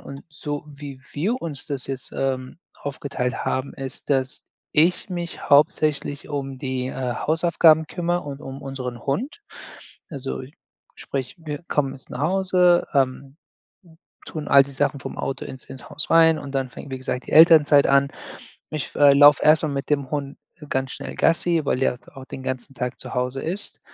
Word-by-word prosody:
Und 140 Hz, 0 st, -10 dB
so 150 Hz, -1 st, -5 dB
wie 140 Hz, -2 st, -10 dB
wir 210 Hz, -, -1 dB
uns 150 Hz, -5 st, -6 dB
das 140 Hz, -4 st, -3 dB
jetzt, 135 Hz, -2 st, -6 dB
ähm, 130 Hz, +1 st, -2 dB, 0.2 s
aufgeteilt 140 Hz, -2 st, -4 dB
haben 130 Hz, +1 st, -1 dB
ist, 135 Hz, +1 st, -8 dB
dass 130 Hz, -1 st, 0 dB, 0.3 s
ich 170 Hz, +6 st, +3 dB
mich 175 Hz, -1 st, -5 dB
hauptsächlich 145 Hz, 0 st, +2 dB
um 135 Hz, -2 st, -4 dB
die, 130 Hz, -1 st, -2 dB
äh, 130 Hz, -2 st, -3 dB
Hausaufgaben 160 Hz, 0 st, +3 dB
kümmere 175 Hz, +1 st, -1 dB
und 145 Hz, -1 st, -7 dB
unseren 135 Hz, -3 st, -7 dB
Hund. 255 Hz, -, -2 dB, 0.7 s
Also, 135 Hz, -2 st, -5 dB, 0.5 s
sprich, 130 Hz, +1 st, -5 dB
wir 155 Hz, -1 st, -6 dB
kommen 135 Hz, -2 st, 0 dB
jetzt 130 Hz, -, -15 dB
nach 130 Hz, -, -6 dB
Hause, 180 Hz, +1 st, +3 dB
ähm, 135 Hz, 0 st, 0 dB, 0.9 s
tun 155 Hz, -2 st, -6 dB
all 140 Hz, -1 st, +8 dB
die 140 Hz, -, -12 dB
Sachen 140 Hz, +1 st, 0 dB
vom -, -, -7 dB
Auto 135 Hz, -1 st, -3 dB
ins 130 Hz, -, -9 dB
ins 130 Hz, -2 st, -10 dB
Haus 150 Hz, +1 st, -4 dB
rein 165 Hz, -1 st, +6 dB
und 140 Hz, -1 st, -8 dB
dann 135 Hz, -1 st, 0 dB
fängt, 140 Hz, -, -10 dB
wie 130 Hz, -, -3 dB
gesagt, 130 Hz, -1 st, -4 dB
die -, -, -7 dB
Elternzeit 155 Hz, -3 st, +7 dB
an. 140 Hz, 0 st, +4 dB, 0.6 s
Ich 150 Hz, -4 st, -4 dB
laufe 145 Hz, 0 st, +7 dB
erst 155 Hz, +1 st, +6 dB
mal 155 Hz, -, 0 dB
mit 140 Hz, -1 st, -4 dB
dem 140 Hz, -3 st, 0 dB
Hund 140 Hz, -1 st, -4 dB, 0.3 s
ganz 130 Hz, -1 st, -1 dB
schnell -, -, -7 dB
Gassi, 165 Hz, -1 st, +2 dB
weil 135 Hz, -, +1 dB
der 125 Hz, -2 st, +1 dB, 0.2 s
auch 135 Hz, -1 st, -9 dB
den 135 Hz, -, -8 dB
ganzen 130 Hz, +1 st, -4 dB
Tag 125 Hz, 0 st, -4 dB
zu -, -, -7 dB
Hause 125 Hz, +1 st, -1 dB
ist. 190 Hz, +6 st, -5 dB
140 Hz, 170 wpm, -23 LUFS, 135-155 Hz, 0.9 s, all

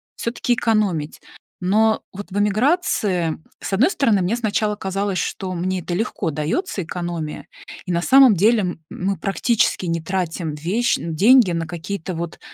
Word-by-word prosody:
всё-таки 240 Hz, +1 st, -1 dB
экономить. 205 Hz, -10 st, 0 dB, 0.4 s
Но 220 Hz, +4 st, +2 dB
вот 200 Hz, 0 st, -8 dB
в 205 Hz, -, -1 dB
эмиграции, 210 Hz, -, +1 dB, 0.2 s
с -, -, -5 dB
одной 265 Hz, -, +4 dB
стороны, 220 Hz, -8 st, +2 dB
мне 205 Hz, +7 st, 0 dB
сначала 210 Hz, -2 st, 0 dB
казалось, 195 Hz, 0 st, -2 dB
что 185 Hz, +1 st, -3 dB
мне 180 Hz, +1 st, -2 dB
это 175 Hz, -, -5 dB
легко 195 Hz, -4 st, -2 dB
даётся, 170 Hz, -, -2 dB
экономия 165 Hz, -3 st, -5 dB, 0.4 s
и, 180 Hz, -, -3 dB
на 170 Hz, 0 st, +1 dB
самом 265 Hz, +1 st, +7 dB
деле, 215 Hz, +5 st, +4 dB
м 175 Hz, -3 st, -4 dB
мы 195 Hz, +1 st, -2 dB
практически 205 Hz, -1 st, 0 dB
не 165 Hz, -1 st, -1 dB
тратим 170 Hz, -3 st, -3 dB
вещь 190 Hz, +11 st, 0 dB
нь 165 Hz, -1 st, -5 dB
деньги 230 Hz, +1 st, +6 dB
на 165 Hz, -1 st, -2 dB
какие-то, 175 Hz, +2 st, -5 dB
вот, 170 Hz, 0 st, -5 dB
190 Hz, 160 wpm, -21 LUFS, 170-220 Hz, 0.4 s, самом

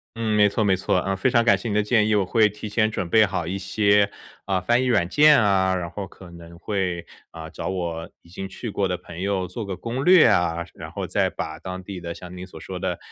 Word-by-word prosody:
嗯， 115 Hz, -2 st, -1 dB
没 105 Hz, -1 st, +5 dB
错 110 Hz, +2 st, 0 dB
没 100 Hz, -2 st, +3 dB
错。 95 Hz, 0 st, 0 dB
嗯， 95 Hz, 0 st, 0 dB
非 100 Hz, +7 st, +1 dB
常 115 Hz, -1 st, +3 dB
感 120 Hz, -, +6 dB
谢 120 Hz, -, -5 dB
你 105 Hz, -, -1 dB
的 105 Hz, -, +3 dB
建 105 Hz, 0 st, +2 dB
议， 110 Hz, -, +2 dB
我 100 Hz, -2 st, +2 dB
会 110 Hz, +3 st, +3 dB
提 105 Hz, +1 st, -8 dB
前 110 Hz, +1 st, +1 dB
准 100 Hz, -4 st, -3 dB
备 110 Hz, +4 st, +5 dB
好 95 Hz, -4 st, -3 dB
一 95 Hz, +4 st, -3 dB
些， 100 Hz, +1 st, +2 dB, 0.4 s
呃， 95 Hz, -2 st, 0 dB
翻 120 Hz, +7 st, +2 dB
译 130 Hz, -, 0 dB
软 100 Hz, -8 st, +2 dB
件 150 Hz, -, +6 dB
啊， 95 Hz, -3 st, +2 dB
然 85 Hz, -2 st, -3 dB
后 100 Hz, -2 st, -6 dB
可 90 Hz, 0 st, -14 dB
能 85 Hz, 0 st, -13 dB
会， 90 Hz, -2 st, -2 dB, 0.3 s
呃， 80 Hz, 0 st, -8 dB
找 -, -, -5 dB
我 85 Hz, -3 st, -4 dB
已 85 Hz, -, -20 dB
经 95 Hz, +2 st, -7 dB
去 115 Hz, +3 st, -6 dB
过 100 Hz, -1 st, 0 dB
的 90 Hz, -, -2 dB
朋 90 Hz, -1 st, -11 dB
友 95 Hz, -1 st, -1 dB
做 95 Hz, +6 st, -6 dB
个 95 Hz, -2 st, -5 dB
攻 120 Hz, +3 st, -4 dB
略 180 Hz, 0 st, +7 dB
啊。 85 Hz, -1 st, +1 dB
然 -, -, -9 dB
后 -, -, -4 dB
再 -, -, 0 dB
把 80 Hz, 0 st, -6 dB
当 95 Hz, +1 st, -7 dB
地 95 Hz, -1 st, -7 dB
的 85 Hz, 0 st, -6 dB
像 90 Hz, 0 st, -10 dB
您 90 Hz, +1 st, -8 dB
所 80 Hz, -, -12 dB
说 90 Hz, +3 st, -7 dB
的， -, -, -2 dB
95 Hz, 280 characters per minute, -23 LUFS, 90-105 Hz, 0.4 s, 略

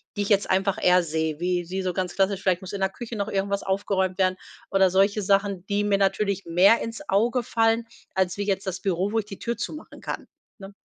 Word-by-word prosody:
die 205 Hz, -, -1 dB
ich 200 Hz, -, -2 dB
jetzt 205 Hz, -1 st, +2 dB
einfach 190 Hz, +1 st, +1 dB
eher 180 Hz, 0 st, +5 dB
sehe, 160 Hz, -1 st, -2 dB
wie 175 Hz, -1 st, -1 dB
wie 190 Hz, +1 st, -2 dB
so 185 Hz, -1 st, -2 dB
ganz 180 Hz, 0 st, -3 dB
klassisch, 195 Hz, 0 st, +1 dB
vielleicht 185 Hz, -2 st, +1 dB
muss 190 Hz, -, -8 dB
in 200 Hz, -, -3 dB
der 190 Hz, -, +2 dB
Küche 235 Hz, +3 st, -7 dB
noch 200 Hz, -, -2 dB
irgendwas 200 Hz, -1 st, -1 dB
aufgeräumt 190 Hz, -1 st, 0 dB
werden 185 Hz, -1 st, +2 dB, 0.3 s
oder 195 Hz, -1 st, +4 dB
solche 200 Hz, +3 st, +2 dB
Sachen, 195 Hz, -1 st, +1 dB
die 205 Hz, 0 st, 0 dB
mir 205 Hz, -1 st, +2 dB
natürlich 200 Hz, 0 st, 0 dB
mehr 180 Hz, +7 st, +5 dB
ins 230 Hz, -1 st, -5 dB
Auge 235 Hz, +5 st, +2 dB
fallen, 225 Hz, 0 st, +1 dB, 0.3 s
als 190 Hz, -1 st, +1 dB
wie 205 Hz, -, -1 dB
jetzt 195 Hz, -1 st, -1 dB
das 185 Hz, 0 st, -3 dB
Büro, 190 Hz, +1 st, 0 dB
wo 225 Hz, -, +1 dB
ich 215 Hz, -, -4 dB
die 200 Hz, -2 st, -10 dB
Tür 235 Hz, 0 st, -3 dB
zumachen 305 Hz, -, -7 dB
kann, -, -, -5 dB, 0.3 s
ne? 195 Hz, -1 st, -11 dB
195 Hz, 230 wpm, -25 LUFS, 185-205 Hz, 0.3 s, eher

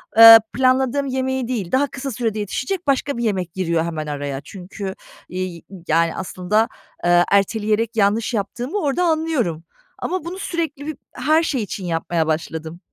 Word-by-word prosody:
ama, 225 Hz, -, +8 dB
eee, 225 Hz, 0 st, +12 dB
planladığım 265 Hz, +2 st, +2 dB
yemeği 260 Hz, -1 st, -1 dB
değil, 220 Hz, -8 st, -3 dB
daha 280 Hz, +2 st, +3 dB
kısa 270 Hz, 0 st, -5 dB
sürede 220 Hz, -2 st, -2 dB
yetişecek 285 Hz, -, -3 dB
başka 275 Hz, -1 st, +1 dB
bir 235 Hz, -, -2 dB
yemek 185 Hz, -6 st, -1 dB
giriyor 170 Hz, -3 st, 0 dB
hemen 155 Hz, -2 st, -4 dB
araya. 140 Hz, -1 st, -4 dB
Çünkü, 190 Hz, +1 st, -7 dB, 0.3 s
iii, 185 Hz, -1 st, -4 dB
y 185 Hz, -4 st, -12 dB
yani 165 Hz, +1 st, +2 dB
aslında, 190 Hz, +4 st, 0 dB, 0.4 s
aaa, 175 Hz, 0 st, +5 dB
erteleyerek 215 Hz, +3 st, +1 dB
yanlış 215 Hz, +3 st, +2 dB
yaptığımı 240 Hz, -, -3 dB
orada 295 Hz, +2 st, 0 dB
anlıyorum 315 Hz, -, 0 dB, 0.4 s
ama 370 Hz, -3 st, -3 dB
bunu 360 Hz, +3 st, -6 dB
sürekli 320 Hz, -6 st, -3 dB
bir 310 Hz, -, -4 dB, 0.2 s
her 315 Hz, +2 st, +2 dB
şey 260 Hz, -8 st, -1 dB
için 190 Hz, -1 st, -6 dB
yapmaya 165 Hz, -1 st, -1 dB
başladım. 160 Hz, +1 st, -3 dB
220 Hz, 160 wpm, -21 LUFS, 175-265 Hz, 0.4 s, eee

